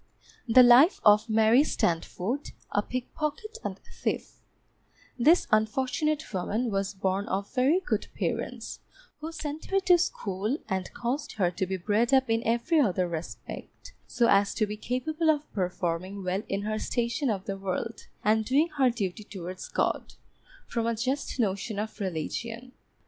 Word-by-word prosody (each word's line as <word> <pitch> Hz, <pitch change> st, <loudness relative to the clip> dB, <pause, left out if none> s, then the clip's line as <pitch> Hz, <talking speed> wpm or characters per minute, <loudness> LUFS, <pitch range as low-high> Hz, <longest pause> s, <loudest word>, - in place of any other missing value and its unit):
The 250 Hz, +2 st, +8 dB
Life 250 Hz, +8 st, +7 dB
of 210 Hz, +2 st, +6 dB
MARY 220 Hz, +4 st, +5 dB
STANDFORD, 190 Hz, -, -1 dB, 0.2 s
a 205 Hz, -, +2 dB
Pickpocket 305 Hz, -, -4 dB
and -, -, -4 dB, 0.2 s
Thief -, -, -2 dB, 0.8 s
This 315 Hz, +9 st, +5 dB
unfortunate 265 Hz, +8 st, +1 dB
woman 215 Hz, +6 st, -1 dB
was 195 Hz, 0 st, -1 dB
born 190 Hz, +1 st, -1 dB
of 200 Hz, +1 st, -3 dB
very 270 Hz, +8 st, +3 dB
good 380 Hz, -, -2 dB
parents, -, -, -3 dB, 0.4 s
who 315 Hz, +2 st, -5 dB
sent 310 Hz, -1 st, -5 dB
her 390 Hz, -, +2 dB
to 360 Hz, -2 st, +5 dB
school, 215 Hz, -, -1 dB
and 190 Hz, -1 st, -2 dB
caused 265 Hz, +5 st, -2 dB
her 180 Hz, -4 st, +1 dB
to 185 Hz, +2 st, -2 dB
be 190 Hz, +1 st, -2 dB
bred 215 Hz, +8 st, +2 dB
up 260 Hz, -3 st, +2 dB
in 225 Hz, 0 st, +2 dB
every 240 Hz, +9 st, +2 dB
other 185 Hz, -9 st, +2 dB
respect 165 Hz, -1 st, -8 dB
so 235 Hz, -, +2 dB
as 200 Hz, -2 st, +3 dB
to 215 Hz, -, +2 dB
be 210 Hz, 0 st, -5 dB
capable 305 Hz, +9 st, -1 dB
of 300 Hz, -1 st, 0 dB
performing 185 Hz, +1 st, -2 dB
well 185 Hz, +2 st, -1 dB
in 200 Hz, +1 st, -1 dB
her 215 Hz, +1 st, -2 dB
station 240 Hz, +5 st, -1 dB
of 195 Hz, -3 st, -2 dB
the 195 Hz, -3 st, -3 dB
world, 195 Hz, +4 st, -4 dB, 0.2 s
and 220 Hz, +1 st, +3 dB
doing 285 Hz, +8 st, +2 dB
her 260 Hz, -2 st, +6 dB
duty 215 Hz, -4 st, -3 dB
towards 185 Hz, -3 st, -7 dB
God, -, -, -1 dB, 0.5 s
from 230 Hz, -1 st, -2 dB
a 230 Hz, -, +1 dB
just 260 Hz, +4 st, -2 dB
notion 200 Hz, 0 st, -1 dB
of 215 Hz, +1 st, -4 dB
religion. 225 Hz, +7 st, -4 dB
225 Hz, 155 wpm, -28 LUFS, 195-265 Hz, 0.8 s, The